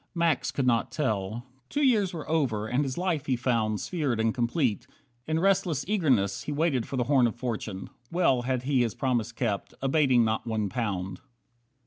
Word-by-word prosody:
Max 170 Hz, -6 st, +1 dB
could 130 Hz, 0 st, -1 dB
not 120 Hz, -2 st, +2 dB
tell. 110 Hz, -4 st, -2 dB, 0.2 s
Two 295 Hz, -, 0 dB
years 215 Hz, -8 st, +3 dB
were 160 Hz, -4 st, -7 dB
over 135 Hz, -10 st, 0 dB
and 125 Hz, +6 st, +1 dB
his 130 Hz, -2 st, -4 dB
life 175 Hz, -5 st, -1 dB
he 130 Hz, -, +2 dB
found 115 Hz, -4 st, 0 dB
Sphered 145 Hz, -10 st, -1 dB
and 110 Hz, 0 st, +2 dB
complete. 120 Hz, -2 st, 0 dB, 0.4 s
In 160 Hz, 0 st, +1 dB
restless 175 Hz, -6 st, +1 dB
eagerness 130 Hz, -, +1 dB
He -, -, -5 dB
waited 145 Hz, -5 st, 0 dB
for 135 Hz, -, -4 dB
the 125 Hz, -, +2 dB
"Horn 130 Hz, -2 st, +4 dB
of 115 Hz, -, -4 dB
Fortune". 115 Hz, -5 st, -4 dB, 0.2 s
Well 170 Hz, -8 st, +3 dB
Had 125 Hz, 0 st, -1 dB
he 135 Hz, -1 st, +2 dB
his 115 Hz, -3 st, 0 dB
promise 120 Hz, -4 st, 0 dB
kept, 115 Hz, -4 st, -3 dB
abating 135 Hz, -4 st, +3 dB
not 110 Hz, +2 st, -1 dB
one 110 Hz, -3 st, -1 dB
pound. 95 Hz, -5 st, -3 dB
130 Hz, 180 wpm, -27 LUFS, 115-155 Hz, 0.4 s, Horn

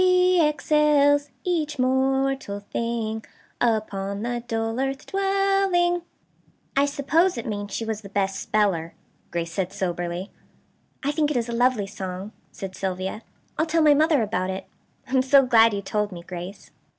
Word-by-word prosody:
She 365 Hz, -1 st, +4 dB
excels 295 Hz, -1 st, +3 dB
each 310 Hz, -5 st, -1 dB
mortal 265 Hz, -3 st, +1 dB
thing, 220 Hz, +1 st, -3 dB, 0.4 s
Upon 205 Hz, -3 st, 0 dB
the 240 Hz, 0 st, -2 dB
dull 225 Hz, +1 st, -2 dB
earth 270 Hz, +1 st, -2 dB
dwelling.' 390 Hz, -3 st, +2 dB, 0.7 s
"I 280 Hz, +1 st, +4 dB
suppose 310 Hz, +5 st, +2 dB
it 235 Hz, -, -4 dB
means 205 Hz, -2 st, -4 dB
she 225 Hz, -, -3 dB
was 220 Hz, -1 st, -3 dB
the 200 Hz, -, -10 dB
best 195 Hz, -1 st, -1 dB
speller," 185 Hz, -6 st, 0 dB, 0.3 s
Grace 170 Hz, -1 st, -3 dB
said 190 Hz, -1 st, -2 dB
soberly. 175 Hz, -1 st, -3 dB, 0.7 s
"I 285 Hz, -, +1 dB
think 300 Hz, 0 st, +1 dB
it 295 Hz, -, 0 dB
is 235 Hz, 0 st, -1 dB
a -, -, -3 dB
lovely 240 Hz, -3 st, +2 dB
song," 190 Hz, 0 st, -6 dB, 0.2 s
said 190 Hz, -2 st, -7 dB
Sylvia. 190 Hz, +2 st, -3 dB, 0.4 s
"I'll 315 Hz, -, +2 dB
tell 325 Hz, 0 st, +2 dB
my 300 Hz, -1 st, +7 dB
mother 305 Hz, -3 st, +3 dB
about 185 Hz, -3 st, -1 dB
it. 190 Hz, 0 st, -4 dB, 0.4 s
I -, -, -13 dB
am 260 Hz, -1 st, +4 dB
so 270 Hz, +1 st, +5 dB
glad 230 Hz, -2 st, +6 dB
you 200 Hz, -1 st, -3 dB
told 210 Hz, +1 st, -1 dB
me, 170 Hz, -2 st, -8 dB
Grace." 180 Hz, +3 st, -8 dB
235 Hz, 160 wpm, -24 LUFS, 200-290 Hz, 0.7 s, my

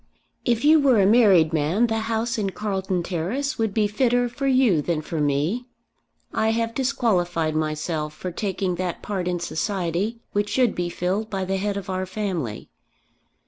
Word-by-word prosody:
"If 240 Hz, +2 st, +1 dB
you 310 Hz, +1 st, +7 dB
were 265 Hz, -6 st, +4 dB
a 195 Hz, -, +5 dB
married 195 Hz, -7 st, +5 dB
man 160 Hz, +9 st, +2 dB
the 225 Hz, -1 st, 0 dB
house 225 Hz, +1 st, -1 dB
in 200 Hz, -2 st, 0 dB
Carlton 190 Hz, -3 st, -2 dB
Terrace 215 Hz, -, -2 dB
would 220 Hz, -2 st, +1 dB
be 215 Hz, +1 st, +2 dB
fitter 245 Hz, +3 st, +2 dB
for 275 Hz, +3 st, -3 dB
you 255 Hz, -, +4 dB
than 165 Hz, +1 st, -1 dB
for 155 Hz, 0 st, -3 dB
me. 150 Hz, -, 0 dB, 0.7 s
I 220 Hz, -, +1 dB
have 230 Hz, 0 st, 0 dB
disqualified 185 Hz, -, 0 dB
myself 155 Hz, 0 st, -2 dB
for 180 Hz, +3 st, -5 dB
taking 190 Hz, -1 st, -2 dB
that 180 Hz, -1 st, -3 dB
part 190 Hz, -4 st, -3 dB
in 180 Hz, -1 st, -1 dB
society 190 Hz, +4 st, -2 dB
which 205 Hz, 0 st, 0 dB
should 245 Hz, 0 st, +2 dB
be 175 Hz, -1 st, -2 dB
filled 190 Hz, +5 st, -2 dB
by 195 Hz, -2 st, -2 dB
the 190 Hz, +1 st, -1 dB
head 200 Hz, +1 st, -1 dB
of 200 Hz, -, -6 dB
our 185 Hz, 0 st, -2 dB
family. 180 Hz, -, -3 dB
195 Hz, 175 wpm, -24 LUFS, 175-230 Hz, 0.7 s, you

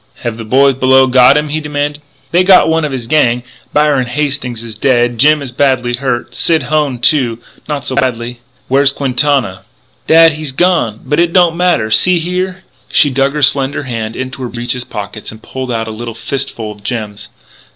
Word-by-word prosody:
"Have 120 Hz, -2 st, -3 dB
the 115 Hz, -, -7 dB
boys 135 Hz, +5 st, +3 dB
below 130 Hz, 0 st, +4 dB
got 130 Hz, +2 st, +5 dB
him?" 150 Hz, 0 st, -1 dB
he 155 Hz, +2 st, -2 dB
demanded. 145 Hz, 0 st, -3 dB, 0.3 s
"They 175 Hz, +2 st, +3 dB
got 185 Hz, 0 st, +5 dB
one 160 Hz, 0 st, +1 dB
of 150 Hz, -, -2 dB
his 130 Hz, -3 st, -5 dB
gang. 125 Hz, -3 st, +1 dB, 0.3 s
Byron 145 Hz, -4 st, +2 dB
Hastings 130 Hz, -3 st, -2 dB
is 115 Hz, -2 st, -8 dB
dead. 120 Hz, 0 st, +1 dB
Jim 150 Hz, +2 st, +4 dB
is 130 Hz, -, -6 dB
badly 125 Hz, -2 st, 0 dB
hurt; 125 Hz, -2 st, -3 dB
Sid 160 Hz, -4 st, +1 dB
Hone, 145 Hz, -1 st, -1 dB
too, 120 Hz, -2 st, +2 dB, 0.3 s
not 145 Hz, -2 st, -3 dB
so -, -, -2 dB
badly 125 Hz, -3 st, -2 dB
" -, -, -38 dB
"Where's 140 Hz, +1 st, +3 dB
Quintana?" 135 Hz, -6 st, 0 dB, 0.5 s
"Dad, 165 Hz, 0 st, +6 dB
he's 155 Hz, -2 st, -5 dB
gone.... 150 Hz, -, 0 dB
But 150 Hz, +2 st, 0 dB
it 170 Hz, 0 st, +1 dB
don't 175 Hz, -3 st, +4 dB
matter. 170 Hz, -12 st, +1 dB
See 180 Hz, +11 st, +4 dB
here! 180 Hz, +2 st, -3 dB
" -, -, -35 dB
She 145 Hz, -, +3 dB
dug 135 Hz, +1 st, 0 dB
her 150 Hz, -1 st, -2 dB
slender 135 Hz, +1 st, +2 dB
hand 115 Hz, -3 st, -5 dB
into 130 Hz, 0 st, -6 dB
her 125 Hz, -, -4 dB
breeches' 120 Hz, +1 st, -4 dB
pocket 105 Hz, +1 st, -7 dB
and 110 Hz, -, -13 dB
pulled 130 Hz, -1 st, -6 dB
out 115 Hz, -1 st, -2 dB
a -, -, -5 dB
little 115 Hz, +1 st, -7 dB
fistful 115 Hz, -3 st, -3 dB
of 105 Hz, -1 st, -14 dB
gems. 105 Hz, -3 st, -5 dB
130 Hz, 195 wpm, -13 LUFS, 120-150 Hz, 0.5 s, Dad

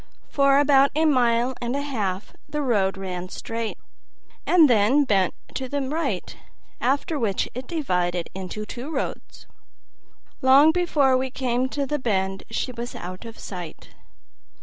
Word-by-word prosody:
For 275 Hz, -1 st, +4 dB
about 280 Hz, -1 st, +5 dB
a 315 Hz, +1 st, +3 dB
mile 245 Hz, -3 st, +3 dB
and 240 Hz, +2 st, -2 dB
a 285 Hz, -, -1 dB
half 205 Hz, -9 st, -3 dB, 0.2 s
the 300 Hz, -1 st, -2 dB
road 200 Hz, -7 st, +1 dB
ran 185 Hz, -1 st, -5 dB
straight, 225 Hz, +2 st, -4 dB, 0.7 s
and 335 Hz, -4 st, +6 dB
then 240 Hz, +4 st, +4 dB
bent 195 Hz, -8 st, +1 dB, 0.2 s
to 260 Hz, -1 st, -4 dB
the 285 Hz, -, -1 dB
right, 295 Hz, +5 st, -2 dB, 0.4 s
after 285 Hz, +4 st, 0 dB
which 205 Hz, -6 st, 0 dB
it 255 Hz, +1 st, -6 dB
divided 180 Hz, -, -1 dB
into 190 Hz, +3 st, -5 dB
two 245 Hz, +6 st, -7 dB
roads. 290 Hz, -4 st, -5 dB, 1.0 s
Long 275 Hz, +4 st, +7 dB
before 305 Hz, -6 st, +2 dB
we 260 Hz, +1 st, -1 dB
came 255 Hz, 0 st, -1 dB
to 280 Hz, 0 st, -2 dB
the 295 Hz, +2 st, -2 dB
bend 195 Hz, -5 st, -1 dB
she 255 Hz, -, -2 dB
was 240 Hz, 0 st, -6 dB
out 185 Hz, +4 st, -7 dB
of 230 Hz, 0 st, -9 dB
sight. 175 Hz, -5 st, -8 dB
250 Hz, 150 wpm, -24 LUFS, 200-280 Hz, 1.0 s, Long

